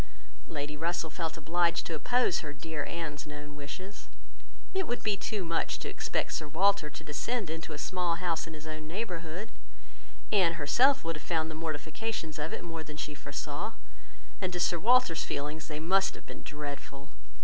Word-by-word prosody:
Lady 150 -1 -3
Russell 165 +1 0
felt 165 -1 -2
obliged 170 +2 +2
to 165 - -2
oppose 245 +5 +3
her 150 -2 -4
dear 150 +1 -3
Anne's 150 -4 -3
known 150 0 -7
wishes. 185 +8 -7 0.7
It 380 -2 +1
would 240 - -1
be 210 -2 +3
too 200 -1 -2
much 165 0 +1
to - - -4
expect - - 0
Sir 155 - -1
Walter 165 0 +4
to - - -8
descend 195 +5 -1
into 160 0 -4
a 150 - -3
small 175 +1 +1
house 170 -2 0
in 160 - -6
his 155 0 -9
own 155 0 -5
neighbourhood. 180 0 -3 0.8
Anne 185 -5 +6
herself 240 - +5
would 165 -1 -1
have 150 - -10
found 160 -2 +2
the - - -5
mortifications 160 +2 -2
of 150 +2 -1
it - - -3
more 165 -1 -4
than 150 -1 -8
she 150 - -2
foresaw, 145 +7 -3 0.7
and 185 -1 +1
to 175 - 0
Sir 175 -1 +3
Walter's 235 -5 +5
feelings 150 +2 -2
they 150 -1 -3
must 190 +4 +4
have - - -11
been - - -8
dreadful. 145 -2 -6
165 Hz, 180 wpm, -32 LUFS, 150-180 Hz, 0.8 s, Anne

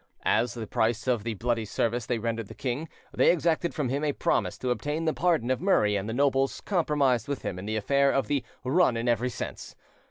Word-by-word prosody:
As 120 0 +2
the 115 -2 -4
price 115 +2 0
of 120 -5 +1
the 115 -1 -3
bloody 115 +2 -1
service 115 +3 -1
they 120 - 0
rendered 115 -1 -3
the - - -11
king, 135 +5 -3 0.2
they - - +5
exacted 170 0 0
from 145 -5 -1
him 140 +3 -1
a 150 -2 +1
promise - - 0
to 125 - -2
obtain 150 +6 -2
the 160 - +2
pardon 160 -8 +1
of 130 - 0
Murray 105 - +3
and 100 +2 -2
the - - -2
nobles 135 +1 +1
compromised 145 - +1
with 140 -2 -4
him 90 - -4
in 95 - -7
the 110 - -1
affair 140 +6 +3
of 135 -3 +1
the 140 +2 -1 0.2
"run 130 -2 +3
in 115 +1 -2
every 120 +1 +1
sense". - - -7
125 Hz, 225 wpm, -27 LUFS, 115-145 Hz, 0.2 s, they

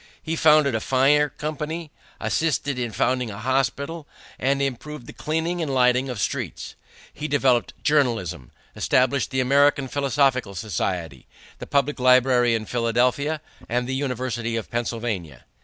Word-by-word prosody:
He 165 0 -2
founded 155 -4 +5
a 110 - +1
fire 140 +5 +3
company, 155 +2 -5 0.3
assisted 145 -4 0
in 120 -2 -2
founding 125 +3 0
a 100 - -7
hospital, 135 +6 -1 0.3
and 140 +2 +1
improved 140 0 -4
the - - -10
cleaning 160 +3 -2
and 155 -4 -2
lighting 125 0 +3
of 125 -4 -4
streets. - - -3 0.4
He 150 - -4
developed 130 -5 +2
journalism, 115 - 0 0.3
established 130 +1 +2
the 130 -1 0
American 140 +1 +3
Philosophical 130 -5 +1
Society, 85 - -3 0.3
the - - -7
public 140 0 +1
library 125 -1 +4
in 110 -1 -3
Philadelphia, 125 +6 0 0.3
and 125 +2 0
the 130 - -2
University 125 -4 -2
of 115 - -4
Pennsylvania. 110 - -3
130 Hz, 140 wpm, -23 LUFS, 120-145 Hz, 0.4 s, founded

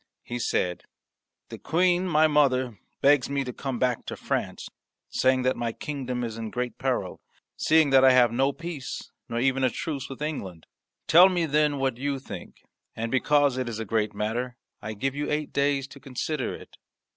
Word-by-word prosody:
He 120 0 -5
said, 90 -6 -1 0.6
"The - - -8
Queen, 180 +2 +2
my 155 -2 +4
mother, 130 - +2 0.2
begs 140 -2 +4
me 140 -1 0
to 125 -1 -6
come 135 -1 -4
back 125 -1 0
to - - -4
France, - - -3 0.4
saying 130 0 +2
that 130 +1 +2
my 115 -1 -2
kingdom 130 -4 -4
is 115 -1 -4
in 110 -1 -4
great 125 0 -4
peril 125 -9 -2 0.3
seeing, 155 -2 +3
that 135 -1 +6
I 130 - +8
have 125 -2 +5
no 135 +4 +2
peace, 165 -2 -7 0.2
nor 115 - -2
even 135 +1 +1
a 130 - +4
truce, 140 +1 -4
with 135 +2 -6
England. 95 - -5 0.4
Tell 175 +4 +8
me, 175 -3 0
then, 150 -1 +2
what 135 -3 -1
you 140 +1 -1
think. 135 - -10 0.3
And 115 +1 -3
because 140 0 +3
it 125 -2 -2
is 115 - -5
a 115 - -4
great 105 0 -1
matter, 120 +4 -2 0.2
I 110 - -5
give 135 +6 -2
you 145 +1 -3
eight 150 0 -2
days 140 -1 +1
to 140 - -12
consider 140 +4 -3
it." - - -14
130 Hz, 190 wpm, -26 LUFS, 120-145 Hz, 0.6 s, I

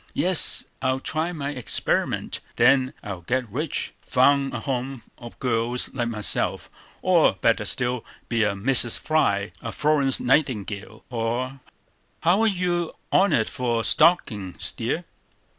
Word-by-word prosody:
"Yes, 180 -1 +4 0.2
I'll 130 0 0
try 160 +5 -2
my 145 -4 -4
experiment; 125 -5 -1 0.2
then 130 -1 +3
I'll 100 -4 -6
get 125 +7 -2
rich; 150 +6 -2
found 135 +1 +2
a - - -5
home 130 -2 -4 0.2
for 120 - -9
girls 120 0 -1
like 120 -3 -2
myself; 105 -3 0 0.3
or, - - +4
better - - +1
still, 125 -1 -1 0.2
be 115 -1 0
a 105 - +1
Mrs. 120 +3 +4
Fry, 100 - 0
a 115 - -5
Florence 145 -2 +2
Nightingale, 110 -6 -1
or"— 120 +3 -3 0.6
"How 175 +6 +3
are 225 - +3
you 180 -4 -1 0.2
on't 170 - +3
for 120 -2 -2
stockin's, 110 - +1
dear?" - - -3
130 Hz, 130 wpm, -24 LUFS, 115-150 Hz, 0.6 s, Yes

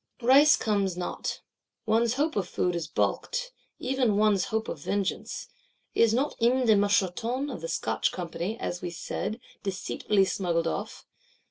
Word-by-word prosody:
Rice 275 +5 +7
comes 200 -4 0
not; 180 - -4 0.4
one's 230 +2 +2
hope 300 +4 0
of 195 -4 0
food 180 0 0
is 170 -2 -3
baulked; - - -1 0.3
even 255 -5 +1
one's 210 -2 +3
hope 220 0 -2
of - - -5
vengeance: 200 -2 -2 0.5
is 230 -1 +4
not 265 +6 +1
M. 250 +2 +3
de 220 -2 +6
Moucheton 205 +7 +1
of 205 - -6
the 165 - -4
Scotch 165 - 0
Company, 180 +4 -4
as 175 - -3
we 180 - -3
said, 215 +6 -4 0.2
deceitfully 195 +1 0
smuggled 170 -3 0
off? 165 - -4
210 Hz, 150 wpm, -28 LUFS, 180-245 Hz, 0.5 s, Rice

